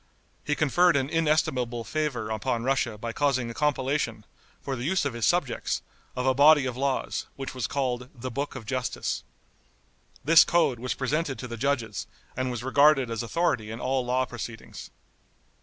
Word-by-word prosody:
He 150 - 0
conferred 170 +4 +3
an 135 0 0
inestimable 130 -7 +1
favor 130 -7 -2
upon 110 +2 -1
Russia 130 -4 0
by 115 +2 -5
causing 130 -4 0
a - - -7
compilation, 135 -5 -1 0.3
for 135 - -4
the 120 - -5
use 175 +3 +1
of 140 - -1
his 115 -2 0
subjects, 175 -8 0 0.3
of 125 - -2
a 130 - +4
body 145 +1 +6
of 125 -2 -3
laws, 135 0 -1
which 135 -1 -6
was 130 -4 -2
called 125 -3 -2
"The 130 +1 -6
Book 140 +4 -3
of 110 - -7
Justice." 130 0 -2 1.0
This 165 +2 +8
code 165 -8 +2
was 125 +1 -2
presented 140 +1 -1
to 125 - -6
the 120 - -6
judges, 120 -4 -1 0.3
and 130 0 -1
was 120 -1 -4
regarded 135 -1 +4
as 115 - -2
authority 115 -4 0
in 115 +1 -6
all 130 0 0
law 125 +1 +1
proceedings. 120 -2 -8
130 Hz, 175 wpm, -27 LUFS, 120-145 Hz, 1.0 s, This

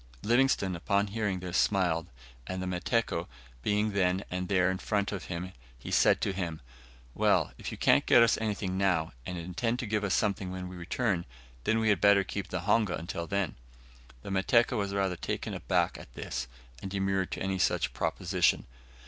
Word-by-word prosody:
Livingstone, 120 -5 +2
upon 100 +4 +1
hearing 100 -3 -2
this, 90 -1 -1
smiled, 90 -4 +2 0.4
and 95 0 -3
the 95 - -3
Mateko 90 -1 -1 0.3
being 105 - +1
then 95 -1 +1
and 90 0 -2
there 95 -1 +3
in 95 - -3
front 100 -2 0
of 100 -3 -5
him, 90 +1 -5 0.2
he 60 - -8
said - - +4
to 100 - 0
him. 85 -4 -3 0.5
"Well, - - +2
if - - -5
you - - -6
can't - - +4
get 120 - +7
us 115 - +4
anything 100 -3 -2
now, 90 -5 +1 0.2
and 90 - -4
intend 95 +8 -2
to 125 - -3
give 105 -2 -1
something 100 -2 0
when 90 0 -5
we 90 - -9
return, 90 +1 -1 0.4
we 110 0 +3
had 100 -4 +2
better 100 -1 +6
keep 100 +1 -5
the 90 - -3
honga 105 -1 +2
until 85 0 -5
then." 100 -2 -1 0.7
The - - -6
Mateko 115 +6 +3
was 100 -3 -1
rather 95 -2 0
taken - - -3
aback - - 0
at - - -13
this, - - -4 0.3
and 95 - -5
demurred 95 -1 0
to - - -4
any 95 0 -1
such - - +1
proposition. 90 -1 +1
95 Hz, 180 wpm, -30 LUFS, 90-105 Hz, 0.7 s, get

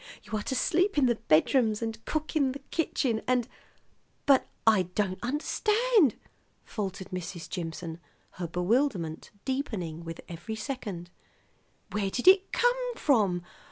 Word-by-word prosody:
You - - -5
are 210 - -1
to 260 - -3
sleep 365 +5 +2
in 285 - +5
the 240 - +4
bedrooms, 215 - +4
and 225 0 -4
cook 310 +1 -2
in 275 -4 +2
the 280 - -7
kitchen, 255 -8 0
and 250 -2 +2 0.4
" - - -40
"But 275 -2 +5 0.2
I 210 -6 +5
don't 190 -3 0
understand," 415 - +2 0.5
faltered 195 -3 -4
Mrs. 180 -2 -5
Jimson, 165 -2 -5 0.3
her 175 -2 -5
bewilderment 180 - 0 0.2
deepening 200 - -3
with 165 0 -7
every 175 +6 -6
second. 210 -8 -5 0.8
"Where 205 -2 0
did 245 - -3
it 385 +1 +7
come - - +1
from? 200 - +2
225 Hz, 140 wpm, -29 LUFS, 180-285 Hz, 0.8 s, it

